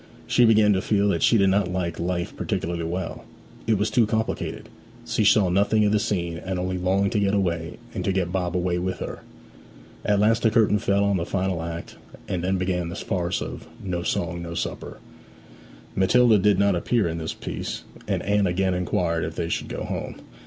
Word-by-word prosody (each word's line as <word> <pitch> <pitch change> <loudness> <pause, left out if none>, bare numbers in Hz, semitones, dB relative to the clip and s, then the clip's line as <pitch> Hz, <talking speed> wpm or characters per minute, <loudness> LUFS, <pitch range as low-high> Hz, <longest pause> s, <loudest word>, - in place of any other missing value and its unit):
She 120 - +4
began 110 -2 +5
to 95 - +1
feel 105 -1 +2
that 85 -4 0
she 115 - +5
did 100 -2 +4
not 100 -1 +2
like 85 -2 -2
life 85 0 -2
particularly 85 0 -2
well; 85 +1 -4 0.4
it 110 -2 +3
was 105 +2 0
too 115 -3 +3
complicated: 110 +1 -2 0.4
she - - 0
saw 100 -1 +5
nothing 105 +4 +3
of 105 - +3
the 105 - +3
scene, 85 -5 -2
and 95 -1 -3
only 90 0 -2
longed 95 +3 +1
to 110 - +1
get 100 0 +2
away, 85 -4 -1 0.2
and - - -3
to - - +2
get 95 -2 -1
Bob 90 -1 -1
away 90 0 0
with 95 +1 -2
her. - - -6 0.8
At 105 -1 +2
last 110 +2 +3
the 115 - +4
curtain 110 -2 +3
fell 100 -1 +2
on 100 -1 +2
the 85 - -2
final 95 -3 -1
act, 85 0 -6 0.3
and 90 -1 -2
then 95 +1 +1
began 90 -2 -1
the 85 - -6
farce 90 -2 -2
of - - -8 0.2
'No 90 -3 -2
Song 85 0 -2
no 85 0 -6
Supper.' - - -4 1.0
Matilda 110 +3 +5
did 105 +1 +3
not 100 -1 +3
appear 105 +3 +1
in 85 0 -3
this 80 - -4
piece, - - -5 0.2
and - - -1
Anne 100 -1 +2
again 95 +1 +1
inquired 85 -2 0
if 80 +1 -4
they 85 -1 -2
should - - -2
go - - -5
home. - - -4
95 Hz, 205 wpm, -24 LUFS, 85-105 Hz, 1.0 s, began